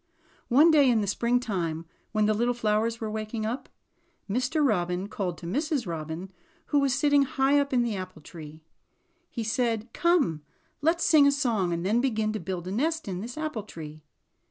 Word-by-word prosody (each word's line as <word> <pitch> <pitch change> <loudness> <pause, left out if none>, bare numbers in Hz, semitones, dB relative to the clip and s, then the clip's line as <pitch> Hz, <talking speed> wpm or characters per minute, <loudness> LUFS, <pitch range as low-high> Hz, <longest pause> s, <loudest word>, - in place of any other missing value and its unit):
One 295 +7 +6
day 290 -4 +5
in 230 -3 +3
the - - -1
springtime, 200 -7 -1 0.3
when 215 -1 +2
the 215 - +3
little 240 +3 0
flowers 225 0 0
were 220 -1 -4
waking 215 0 -4
up, 235 +5 -4 0.6
Mr. 255 +8 +1
Robin 180 -3 0
called 185 -5 -3
to 170 - -10
Mrs. 285 - -1
Robin 165 +2 -5 0.4
who 290 - +5
was 275 -3 +2
sitting 285 +2 +4
high 275 +1 +2
up 280 0 -1
in 250 -2 +3
the 230 -3 -2
apple 185 -4 -7
tree. 155 -2 -11 0.7
He 230 - -4
said: 225 0 -1
''Come 305 - +2 0.4
let's 330 +3 +2
sing 295 -3 +6
a - - +5
song, 230 -10 0
and 170 +1 -2
then 220 +5 +2
begin 220 -4 0
to 215 - -3
build 180 -3 -5
a - - -4
nest 315 +8 -1
in 185 -2 -4
this 240 +5 -7
apple 310 -8 -3
tree." 155 -6 -10
220 Hz, 185 wpm, -27 LUFS, 185-270 Hz, 0.7 s, One